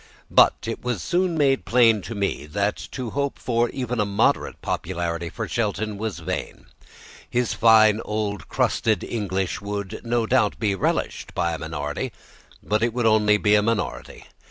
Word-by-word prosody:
But - - +6
it 115 - -5
was 125 -4 -1
soon 175 -1 0
made 135 -3 +2
plain 115 -3 +4
to 115 - -5
me 100 -7 -2
that 100 +6 0 0.2
to 125 -4 -4
hope 140 0 -2
for 120 -1 0
even 125 -2 -3
a - - +4
moderate 100 0 +1
popularity 85 -1 -3
for - - -5
Shelton 105 -2 -2
was 110 -4 -3
vain. 90 +2 -5 0.6
His 120 -1 0
fine 110 -1 +5
old 105 -1 -3
crusted 110 -5 +1
English 95 -5 -2
would, 100 -1 -5
no 120 -1 0
doubt, 110 -3 +2
be 105 -3 0
relished 95 - -2
by 85 +1 0
a 80 - -4
minority, 75 -2 -4 0.5
but 105 +1 0
it 115 0 0
would 125 - 0
be 115 - +5
only 105 -1 +4
by 105 - -1
a 105 0 +6
minority. 110 -1 -3
105 Hz, 170 wpm, -23 LUFS, 100-120 Hz, 0.6 s, But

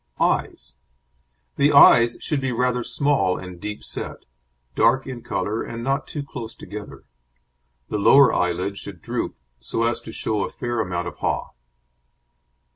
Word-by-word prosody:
EYES - - -1 0.8
The 145 +1 +4
eyes 120 -4 +7
should 150 -3 -1
be 135 -1 -1
rather 125 0 0
small 140 -12 +1
and 90 -2 -9
deep 105 0 -6
set, - - -6 0.5
dark 130 - +3
in 130 -3 -7
colour 110 0 -2
and 115 0 -6
not 135 +2 -1
too 145 - -5
close 120 -5 -8
together; 105 0 -9 0.8
the 105 - -2
lower 135 +3 +6
eyelid 90 +3 -1
should 90 -5 -10
droop, - - -3 0.2
so 115 - -2
as 120 +1 0
to - - -9
show 105 -2 -1
a - - -3
fair 120 -1 -3
amount 90 -4 -2
of - - -8
haw. - - -2
115 Hz, 150 wpm, -23 LUFS, 100-130 Hz, 0.8 s, eyes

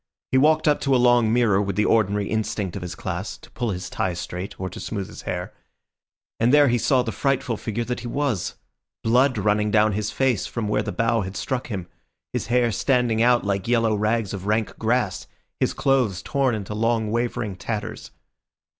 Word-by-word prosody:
He 130 - +4
walked 155 +2 +4
up 150 -2 +3
to 135 -1 +2
a - - +5
long 120 -2 +4
mirror 115 -5 +3
with 100 -2 -2
the 105 - +2
ordinary 105 -2 +2
instinct 105 -4 -2
of 100 - -5
his 90 0 -5
class, 90 +2 -4
to - - -17
pull 120 - -2
his 90 -2 -4
tie 90 -2 -2
straight 90 +2 -6
or 95 - -2
to 90 - -8
smooth 100 -3 -4
his - - -10
hair; 90 0 -4 0.9
and 115 +2 +3
there 145 -1 +6
he 120 0 +2
saw 130 +1 +3
the 115 - -3
frightful 130 +1 0
figure 110 +2 -3
that 125 +1 -3
he 125 - -6
was—blood 125 0 -1
running 105 +1 +1
down 105 +1 +4
his 105 +1 -2
face 130 -6 0
from 115 -3 -3
where 105 - +1
the - - -4
bough 115 0 +1
had 95 0 -5
struck 130 -2 -2
him, 95 -6 -5 0.5
his - - -2
hair 120 -1 +2
standing 120 -1 +1
out 120 -1 +4
like 100 -1 -1
yellow 115 -2 +2
rags 105 0 0
of 100 0 -5
rank 110 0 0
grass, 115 -3 0 0.3
his - - +2
clothes 125 -9 +1
torn 135 -4 +1
into 105 -1 -5
long, 110 0 0
wavering 115 -3 -1
tatters. 105 +3 -5
110 Hz, 200 wpm, -23 LUFS, 100-125 Hz, 0.9 s, there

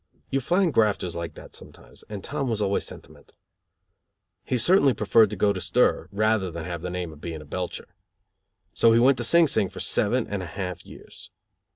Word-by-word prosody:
You 135 - 0
find 175 +4 +1
grafters 105 -5 +1
like 85 -1 -5
that - - -13
sometimes, - - -12
and 105 -2 -7
Tom 140 -2 -3
was 110 -2 -1
always 100 -1 0
sentimental. - - -13 1.1
He 125 - -1
certainly 145 - +4
preferred 110 +1 +4
to 105 - -5
go 100 +1 +2
to 95 - -5
stir - - +1
rather 110 -2 +1
than 85 -1 -7
have 85 -1 -5
the 90 - -4
name 90 -2 -5
of 75 - -16
being 80 -2 -6
a 75 - -12
belcher. 90 +4 -6 0.8
So 115 -1 +4
he 115 - +5
went 130 +2 +4
to - - -2
Sing 170 +7 +5
Sing 100 -8 +1
for - - -10
seven 120 +3 0
and 100 -2 -4
a 90 - -6
half 90 +3 -6
years. - - -13
105 Hz, 200 wpm, -25 LUFS, 90-125 Hz, 1.1 s, he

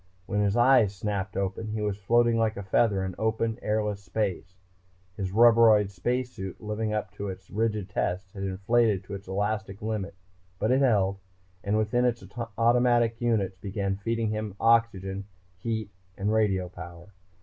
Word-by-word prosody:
When 105 - -1
his 100 +2 +1
eyes 120 -5 +5
snapped 100 0 -3
open 100 +3 -2
he 110 0 -3
was 105 -2 0
floating 120 +4 +2
like 115 0 +1
a 100 - -5
feather 95 0 +2
in 95 - -4
open, 110 +1 0
airless 105 -1 -1
space. 95 -1 -3 0.6
His 95 -1 -3
rubberoid 115 -2 +6
space 125 +7 -2
suit, 95 -4 -7
living 105 0 -3
up 105 -1 -2
to 100 - -6
its 95 -1 -9
rigid 105 -2 -1
tests, 95 -1 -2
had 95 - -7
inflated 100 +2 +1
to 100 - -9
its 100 0 -7
elastic 105 +1 -2
limit. 105 -3 -3 0.4
But 110 +5 0
it 130 +2 +3
held 100 -7 +2 0.4
and 100 +2 +1
within 110 +3 +1
its 120 -4 0 0.3
automatic 120 0 +3
units 105 -6 0
began 100 0 -2
feeding 115 +2 -1
him 105 -2 -3
oxygen, 100 -4 +2 0.3
heat 110 0 -3 0.3
and 100 +2 0
radio 100 -4 +1
power. 85 0 -11
105 Hz, 160 wpm, -27 LUFS, 95-115 Hz, 0.6 s, rubberoid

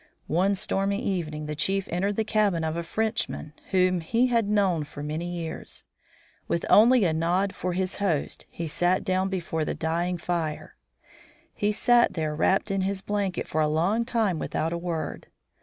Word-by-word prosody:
One 185 +6 +2
stormy 195 +1 0
evening 160 -9 -2
the 150 - -3
chief 195 +5 0
entered 195 +4 0
the 220 - +1
cabin 205 -6 +1
of 160 0 -1
a 170 - -1
Frenchman 215 -4 -2 0.2
whom 185 -1 +3
he 230 +9 +2
had 230 -4 +1
known 195 -6 +2
for 145 0 -8
many 155 +3 -3
years. 170 -2 -6 0.6
With 170 - -1
only 235 0 +7
a 165 - +2
nod 175 +5 +1
for 180 0 -3
his 185 +1 -2
host 185 -8 -1
he 170 - -5
sat 175 +4 +1
down 185 0 +1
before 170 -4 -2
the - - -2
dying 170 +3 -1
fire. 170 -3 -3 0.8
He 205 0 0
sat 240 +3 +4
there 155 -2 -1
wrapt 195 +6 +2
in 195 -1 0
his 190 0 -2
blanket 200 -3 -2
for 155 - 0
a 155 - +3
long 175 +9 +1
time 225 -8 0
without 160 +2 -2
a - - -1
word. 170 -2 -4
185 Hz, 175 wpm, -26 LUFS, 165-200 Hz, 0.8 s, only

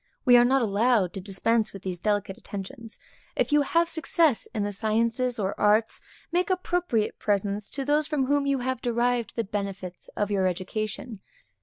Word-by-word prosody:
We 245 -2 +7
are 240 - +7
not 260 +1 +3
allowed 210 -3 +2
to 195 - -5
dispense 215 +3 0
with 195 -1 -10
these 180 -2 -4
delicate 205 -1 -1
attentions. 220 +5 -8 0.4
If - - 0
you 295 0 +5
have 335 +4 +2
success 320 -4 +2
in 220 -2 -3
the 205 - -2
sciences 230 +4 0
or 200 -2 -1
arts, 215 +2 +2 0.3
make 355 +2 +1
appropriate 355 - 0
presents 200 0 -1
to 275 -1 -4
those 295 +1 +2
from 295 -4 0
whom 285 +1 +1
you 275 -2 +1
have 260 -1 -2
derived 240 0 0
the 230 - 0
benefits 195 -3 -5
of 205 0 0
your 190 -2 +2
education. 215 +4 -4
225 Hz, 175 wpm, -26 LUFS, 200-265 Hz, 0.4 s, We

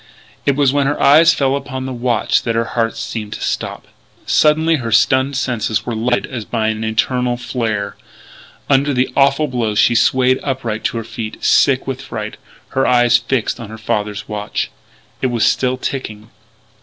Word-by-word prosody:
It 140 - +3
was 140 -2 +2
when 140 -1 +2
her 145 - -1
eyes 160 +4 +6
fell 140 -4 +1
upon 130 -2 -5
the 130 - -4
watch 120 -1 +1
that 115 -1 -2
her 115 0 +1
heart 115 -1 0
seemed 110 -2 -5
to - - -7
stop. - - -3 0.4
Suddenly 160 +1 +3
her 115 -4 -4
stunned 130 +5 +3
senses 120 -5 -1
were 120 - -3
lighted 120 +2 0
as 120 -4 -6
by 110 +1 -1
an 110 0 -3
infernal 120 +3 0
flare.... 110 -5 -3 0.7
Under 140 0 +2
the 125 +1 +1
awful 140 +2 +3
blow 120 -5 -2
she 120 - +4
swayed 130 +2 +3
upright 120 -5 -3
to - - -1
her 115 - -3
feet, 115 -1 -7
sick 135 -2 +3
with 135 -1 -4
fright, 110 -5 -6 0.3
her 135 - 0
eyes 120 -1 +4
fixed 120 -1 -2
on 115 -3 -8
her 110 - -8
father's 105 -1 -3
watch. 105 -1 -3 0.5
It - - +2
was 120 -3 +1
still 130 0 +1
ticking. 110 -5 -5
120 Hz, 180 wpm, -17 LUFS, 110-135 Hz, 0.7 s, eyes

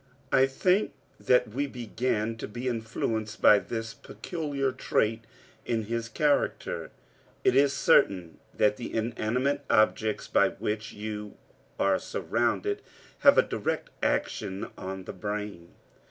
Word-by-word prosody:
I 135 0 +5
think 185 +9 +1 0.3
that 125 -2 +3
we 140 +6 -2
began 115 -2 -2
to - - -5
be 120 +5 -5
influenced 110 -2 -2
by 105 - +7
this 115 0 -5
peculiar 145 -6 -3
trait 115 -3 0 0.4
in 115 -2 -1
his 115 +1 -3
character. 145 +3 0 0.5
It - - +4
is 140 0 +5
certain 90 -12 +3
that 105 0 +2
the 120 - -6
inanimate 120 +5 0
objects 110 0 +2
by - - +4
which 105 0 -4
you 105 0 -6 0.4
are 95 -1 +3
surrounded - - -1 0.4
have - - +7
a - - +7
direct - - -3
action 95 +1 -1
on 95 0 -6
the - - -7
brain. 105 -3 -5
110 Hz, 125 wpm, -28 LUFS, 105-130 Hz, 0.5 s, by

